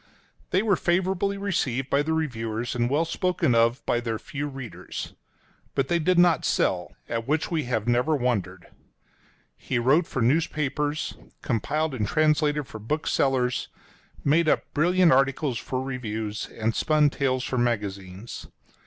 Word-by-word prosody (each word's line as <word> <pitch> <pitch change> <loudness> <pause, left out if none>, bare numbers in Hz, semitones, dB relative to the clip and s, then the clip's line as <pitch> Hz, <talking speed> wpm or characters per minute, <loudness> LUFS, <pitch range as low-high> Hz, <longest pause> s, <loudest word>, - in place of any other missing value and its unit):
They 190 +3 +2
were 200 -5 +3
favorably 190 +3 0
received 135 -10 -1
by 140 - +4
the 160 +2 -1
reviewers, 115 -7 -2
and 120 -1 0
well 150 +5 +2
spoken 175 -5 0
of 115 +3 +2
by 120 - +1
their 115 -2 -2
few 145 +5 -5
readers. 135 -4 -7 0.6
But 135 -1 0
they 170 - +2
did 180 +2 +2
not 175 -4 +5
sell 90 -2 0
— - - -40
at 115 +1 -3
which 155 +4 0
we 160 -5 0
have 115 -3 -1
never 125 +6 +2
wondered. 100 -9 -1 0.9
He 130 - -3
wrote 140 +8 +3
for 125 - -1
newspapers, 150 +2 0 0.3
compiled 150 +6 -1
and 110 -5 -1
translated 150 +1 +2
for 110 -5 -9
booksellers, 130 0 0 0.6
made 155 +3 +3
up - - 0
brilliant 175 +3 +4
articles 135 -1 +2
for 130 - -3
reviews, 110 -5 -4
and 115 0 -2
spun 150 +2 +3
tales 130 -2 0
for 130 - -1
magazines. 100 -3 -3
135 Hz, 150 wpm, -26 LUFS, 120-155 Hz, 0.9 s, not